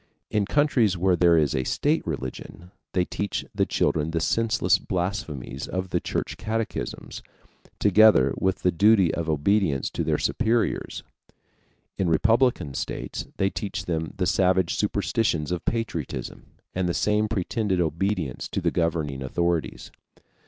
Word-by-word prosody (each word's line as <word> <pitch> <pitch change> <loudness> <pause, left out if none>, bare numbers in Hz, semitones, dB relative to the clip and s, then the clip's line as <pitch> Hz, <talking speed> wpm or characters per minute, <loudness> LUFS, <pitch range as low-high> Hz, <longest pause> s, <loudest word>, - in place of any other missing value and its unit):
In 105 -2 +1
countries 125 -10 +2
where 90 +1 +3
there 85 -1 +4
is 75 -3 +2
a 65 - 0
state 150 - +1
religion, 80 +4 -6 0.2
they 90 -1 +2
teach 100 +2 -3
the - - +1
children 75 0 0
the 80 0 -1
senseless 115 +8 +2
blasphemies 85 - -4
of 95 -1 -4
the - - +1
Church - - -3
catechisms, 110 0 -4 0.6
together 105 -10 +5
with 95 0 0
the 90 - +3
duty 100 0 +4
of 85 -1 -3
obedience 80 -1 +1
to - - -2
their - - +1
superiors. 115 -1 0 1.0
In 95 -3 +1
republican 110 - +2
states - - -4
they 95 0 +1
teach 100 -3 -4
them 80 -2 -3
the 95 - 0
savage 95 -2 +2
superstition 105 -5 0
of 90 - -4
patriotism 105 - -4 0.3
and 90 -1 -1
the 85 - -1
same 105 0 +1
pretended 105 -1 -1
obedience 85 -3 -1
to - - -3
the - - 0
governing 80 -5 -1
authorities. 80 +1 -2
90 Hz, 140 wpm, -25 LUFS, 80-105 Hz, 1.0 s, together